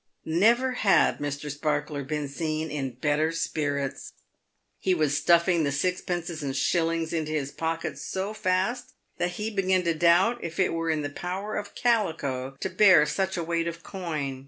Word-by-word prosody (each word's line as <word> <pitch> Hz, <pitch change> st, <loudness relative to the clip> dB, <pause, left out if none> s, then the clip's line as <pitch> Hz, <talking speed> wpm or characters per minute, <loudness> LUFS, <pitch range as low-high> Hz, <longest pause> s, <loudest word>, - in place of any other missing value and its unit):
Never 230 Hz, +10 st, +3 dB
had 210 Hz, -6 st, +3 dB
Mr. 145 Hz, 0 st, -4 dB
Sparkler 150 Hz, 0 st, -2 dB
been 150 Hz, +1 st, -3 dB
seen 155 Hz, +2 st, -3 dB
in 135 Hz, -4 st, -3 dB
better 150 Hz, +4 st, +1 dB
spirits. 145 Hz, -4 st, -2 dB, 0.7 s
He 185 Hz, -1 st, +1 dB
was 150 Hz, -3 st, +1 dB
stuffing 170 Hz, +1 st, +3 dB
the 140 Hz, -, 0 dB
sixpences 175 Hz, +1 st, -2 dB
and 135 Hz, -2 st, -3 dB
shillings 165 Hz, +4 st, 0 dB
into 155 Hz, -2 st, -2 dB
his 140 Hz, -3 st, -2 dB
pocket 165 Hz, +1 st, -3 dB
so 190 Hz, +3 st, -3 dB
fast 190 Hz, +5 st, -1 dB, 0.3 s
that 175 Hz, +1 st, 0 dB
he 215 Hz, +3 st, -3 dB
began 190 Hz, -2 st, +1 dB
to 170 Hz, -1 st, +1 dB
doubt 175 Hz, +9 st, +3 dB
if 170 Hz, +1 st, -5 dB
it 190 Hz, -, +2 dB
were 165 Hz, 0 st, -1 dB
in 155 Hz, -2 st, 0 dB
the 145 Hz, -, -4 dB
power 190 Hz, +6 st, -4 dB
of 205 Hz, -1 st, -5 dB
calico 145 Hz, -, 0 dB
to -, -, -1 dB
bear 185 Hz, -8 st, +6 dB
such 190 Hz, +5 st, -1 dB
a 170 Hz, -, -1 dB
weight 170 Hz, 0 st, -1 dB
of 170 Hz, 0 st, -6 dB
coin. 155 Hz, -8 st, -4 dB
165 Hz, 170 wpm, -27 LUFS, 150-185 Hz, 0.7 s, bear